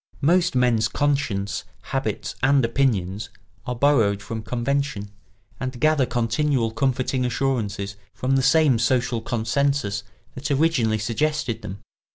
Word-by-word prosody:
Most 175 +2 +3
men's 125 -3 +3
conscience, 120 -9 -1 0.2
habits, - - -3
and 135 -1 +4
opinions 110 -5 0 0.4
are 125 - -2
borrowed 115 -7 +3
from 110 +2 -5
convention 120 -3 -2 0.5
and 130 -1 -4
gather 155 -2 +3
continual 120 +1 0
comforting 130 +2 0
assurances 110 -6 -1
from 130 +1 -1
the 135 - +3
same 135 -2 +4
social 120 0 +1
consensus 120 -1 0 0.3
that 130 - -5
originally 140 -7 +2
suggested 130 +3 -1
them. 95 +1 -8
125 Hz, 120 wpm, -23 LUFS, 110-140 Hz, 0.5 s, and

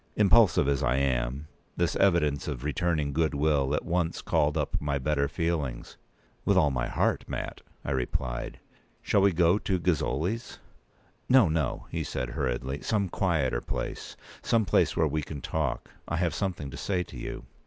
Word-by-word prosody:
Impulsive 105 -7 +5
as 70 -2 +1
I 65 - +2
am, 65 +1 -1 0.3
this 85 -1 +1
evidence 85 -7 +2
of 70 -4 -4
returning 75 -1 0
good 80 0 +1
will 70 -1 +2
at - - -3
once 85 -1 -1
called 75 0 +1
up - - -1
my 70 -1 0
better 70 +1 0
feelings. 70 -5 -2 0.5
"With 100 - +3
all 75 -6 +4
my 60 -1 -1
heart, - - 0
Mat," - - -5 0.2
I - - -2
replied; 60 -1 -2 0.4
"shall 100 - +3
we 100 0 +5
go 85 +3 +3
to 95 -3 0
Gozzoli's?" 90 - -1 0.7
"No, 130 -6 +7
no," 80 -5 -1
he - - -2
said, 65 -2 -3
hurriedly. 65 0 -2
"Some 100 -4 0
quieter 80 -11 0
place—some 115 -2 -3
place - - +2
where 80 - +4
we 75 +1 -1
can 75 0 -7
talk. - - -2 0.2
I 85 - -2
have 85 -1 0
something 85 -7 -3
to - - -8
say 90 -3 -1
to - - -13
you." - - -6
75 Hz, 165 wpm, -28 LUFS, 70-90 Hz, 0.7 s, No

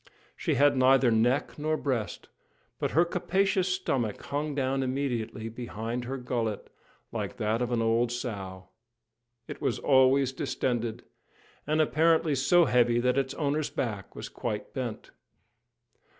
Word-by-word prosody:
She - - -1
had 145 0 +4
neither 130 -1 +5
neck 120 +7 +1
nor 155 +1 0
breast, 125 -9 -3 0.5
but - - 0
her 170 - +6
capacious 190 +2 +1
stomach 135 - -1
hung 145 +1 -3
down 135 -1 0
immediately 125 -4 -2
behind 115 +1 -5
her 135 +2 -4
gullet, 115 -4 -3 0.4
like - - -4
that 110 +2 0
of 125 0 -1
an 115 -1 +1
old 115 +1 +2
sow. 95 -7 -5 0.8
It - - -8
was - - 0
always 130 0 +4
distended, 120 -3 -2 0.6
and 155 +1 +1
apparently 160 0 +3
so 165 +6 +4
heavy 120 -2 +3
that 125 +1 +2
its 135 0 -2
owner's 150 0 -1
back 105 -6 -4
was - - -6
quite 105 -3 -5
bent. 125 -5 -5
130 Hz, 135 wpm, -28 LUFS, 115-145 Hz, 0.8 s, her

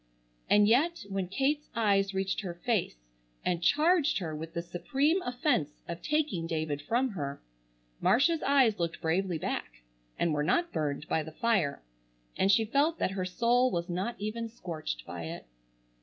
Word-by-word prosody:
And 205 0 +6
yet 300 +9 +2
when 195 -2 -2
Kate's 275 +9 0
eyes 200 -3 +2
reached 190 +1 -1
her 180 -4 -5
face 200 - -1 0.5
and 175 -1 0
charged 310 - +3
her 165 -5 -3
with 160 +2 -7
the 170 - -2
supreme 275 - 0
offense 245 - -1
of 170 0 -5
taking 300 - 0
David 155 -3 -2
from 245 - +1
her, 145 - -4 0.6
Marcia's 310 +7 +3
eyes 265 -7 +3
looked 170 -1 -2
bravely 175 +1 0
back, - - -4 0.3
and 170 -2 +1
were 150 - 0
not 340 - +1
burned 150 0 -2
by 160 - +1
the 155 +1 -8
fire, 190 - 0 0.5
and 195 - +3
she 220 +2 +4
felt 290 +8 +2
that - - 0
her 190 -1 -2
soul 240 +7 +2
was 170 -5 -2
not 185 +7 -2
even 225 +2 -4
scorched 155 - -5
by 85 -1 -6
it. 80 - -7
195 Hz, 165 wpm, -30 LUFS, 165-250 Hz, 0.6 s, And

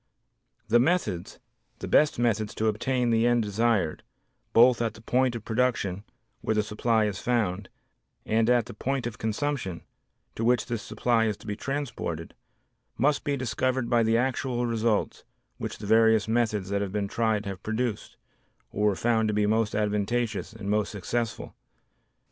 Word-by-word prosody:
The 120 - +4
methods, 120 - 0 0.4
the - - -6
best 150 0 +4
methods 110 -3 0
to 110 - -1
obtain 120 +3 +1
the 115 +1 +3
end 120 -1 +3
desired, 105 -5 0 0.5
both 120 +1 +5
at 115 -1 -1
the 115 - -13
point 125 +2 +1
of 115 - -7
production, 110 -5 0 0.4
where 110 - 0
the 105 - +2
supply 110 +1 +1
is 105 -2 -3
found, 105 -6 -1 0.6
and 110 +1 +2
at 120 -2 +3
the - - -9
point 130 +4 -2
of 120 -2 -5
consumption 110 - -2 0.5
to 115 - -4
which 120 +1 +3
this 120 -3 -3
supply 115 +2 +1
is 105 -2 -1
to - - -16
be 105 -1 -3
transported, 120 - -4 0.6
must 145 +3 +2
be 145 -2 -1
discovered 130 0 -1
by 120 -1 +4
the 115 0 +3
actual 125 -1 0
results 115 -2 0 0.4
which - - -5
the 105 - -8
various 110 0 +4
methods 110 -4 0
that 100 0 0
have 100 -2 -3
been 100 0 -1
tried 110 -1 0
have 95 -2 -6
produced, 110 0 -3 0.5
or 105 +1 +1
were 100 - +2
found 110 +1 +1
to 105 - -1
be 105 0 +2
most 110 0 +1
advantageous 105 +1 -1
and 110 -3 -8
most 105 0 +1
successful. 115 +3 -3
110 Hz, 165 wpm, -27 LUFS, 105-120 Hz, 0.6 s, both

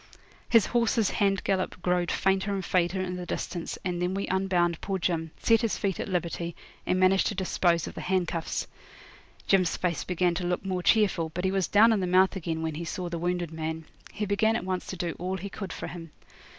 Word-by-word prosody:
His 230 -4 +6
horse's 230 -3 +2
hand 195 -1 +1
gallop 185 -2 -1
growed 180 -1 +1
fainter 195 +1 +1
and 195 -2 -2
fainter 180 +1 +1
in 180 -1 -3
the 180 - -5
distance, 175 -2 -4
and 175 -1 -1
then 180 +1 0
we 200 - -1
unbound 180 -3 +1
poor 195 -1 -2
Jim, 165 -2 -1
set 225 -1 +3
his 230 - 0
feet 195 -3 -1
at - - -3
liberty, 170 -1 -2 0.3
and 185 - +2
managed 185 +1 +4
to 210 - -2
dispose 175 -3 +1
of - - -7
the - - -6
handcuffs. 175 -3 -1 0.8
Jim's 185 -3 +3
face 170 -5 -1
began 180 -1 +1
to 175 +2 -3
look 180 +2 -1
more 185 -1 -1
cheerful, 190 -5 +3
but 180 +1 -1
he 190 - +2
was 190 -3 +1
down 225 +3 +6
in 215 - +1
the 185 - -1
mouth 185 +2 +4
again 165 -3 -3
when 160 -1 -2
he 160 +3 -5
saw 175 +1 -4
the 170 -1 -4
wounded 175 -1 -1
man. 160 0 -4 0.3
He 210 - -3
began 220 +2 +2
at 225 - -2
once 185 -1 -2
to 190 - -5
do 170 -1 -2
all 185 +2 -2
he 195 +2 -6
could 195 - -6
for - - -5
him. 165 -2 -8
185 Hz, 220 wpm, -28 LUFS, 175-195 Hz, 0.8 s, His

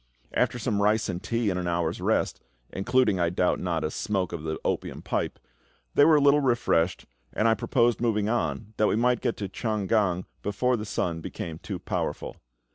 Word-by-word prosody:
After - - +1
some 110 -3 -1
rice 105 +1 +2
and 90 -1 -3
tea 115 -3 0
and 90 - -2
an 90 - -3
hour's 85 -1 -1
rest - - 0 0.3
including, 105 -1 +2
I 85 -1 +2
doubt 90 +1 +1
not, 85 -3 -1
a 75 - -1
smoke 95 -2 -2
of 85 - -4
the 80 0 -3
opium - - -2
pipe - - -2 0.6
they 145 - +6
were 160 0 +6
a - - +5
little 145 +1 +5
refreshed, 120 -9 +1 0.3
and 110 - +2
I 115 - +5
proposed 120 +2 +1
moving 105 -3 +1
on, 105 - -2
that 105 - +3
we - - +2
might 120 +1 +2
get - - -1
to 100 - -3
Chang 105 +1 -2
gan 95 -4 +1 0.2
before 125 +5 +1
the 110 -2 -4
sun 85 -5 -2
became 80 0 -6
too - - -5
powerful. - - -3
105 Hz, 200 wpm, -27 LUFS, 90-120 Hz, 0.6 s, they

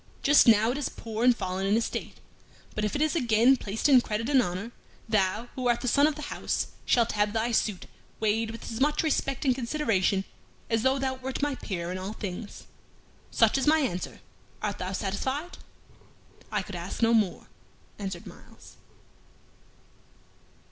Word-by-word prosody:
Just 290 -1 +6
now 220 0 +6
it 275 - -3
is 290 - -1
poor 225 0 -5
and 245 -1 +5
fallen 185 +1 -2
in 205 +3 +3
estate, 230 - -3 0.6
but 215 - -2
if 210 - -1
it 290 - +2
is 310 +2 0
again 240 -2 +4
placed 215 +2 -1
in 265 -4 +7
credit 230 +2 -3
and 270 -3 +5
honor, 190 +3 -4 0.4
thou, 215 +1 +1
who 255 -1 -2
art 240 0 +2
the 250 - -3
son 285 +4 +5
of 310 - -1
the 300 - -7
house, - - -2 0.2
shalt 235 -2 +3
have 210 0 0
thy 225 +1 0
suit 210 -4 0 0.3
weighed 220 +1 +1
with 225 +1 -8
as 225 +3 -5
much 295 +3 +2
respect 275 -2 -1
and 260 - +4
consideration 230 -7 0 0.5
as 225 -1 +2
though 265 +3 +2
thou 265 -1 -1
wert 260 +2 -4
my 290 -1 +1
peer 180 -8 -4
in 185 - -4
all 190 +3 -5
things, 200 0 -7 0.6
Such - - +3
is 270 - -1
my 315 +1 +6
answer. 185 -10 -3 0.4
Art 205 -2 -3
thou 185 +1 -3
satisfied?" 260 - -3 0.9
"I 210 -2 0
could 195 - -8
ask 175 +6 -4
no 230 0 +4
more," 210 -5 +1 0.5
answered 190 -4 -5
Myles. - - -14
230 Hz, 175 wpm, -28 LUFS, 205-265 Hz, 0.9 s, in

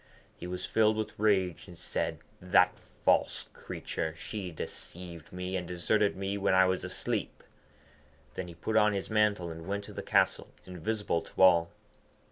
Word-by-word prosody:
He - - -7
was 90 0 -4
filled 110 -1 +3
with 110 -2 -4
rage, 95 -5 +2
and 90 - -12
said, - - -2 0.2
'The 90 0 +5 0.4
false - - +2
creature! 80 0 -4
She 100 +1 -5
deceived 85 0 -7
me, 90 +1 -4
and 90 -2 -2
deserted 100 +4 +1
me 100 +1 -2
when 95 -1 +3
I 95 0 +7
was 95 0 0
asleep.' - - -3 0.9
Then 90 - -5
he 85 - -10
put 110 +6 -3
on 105 -1 +5
his 100 +2 -3
mantle, 105 -5 +2
and 80 +1 -8
went 100 +1 -2
to - - -10
the - - -5
castle, - - +2 0.2
invisible 90 0 -1
to - - -5
all. 85 -2 +6
95 Hz, 165 wpm, -30 LUFS, 85-105 Hz, 0.9 s, I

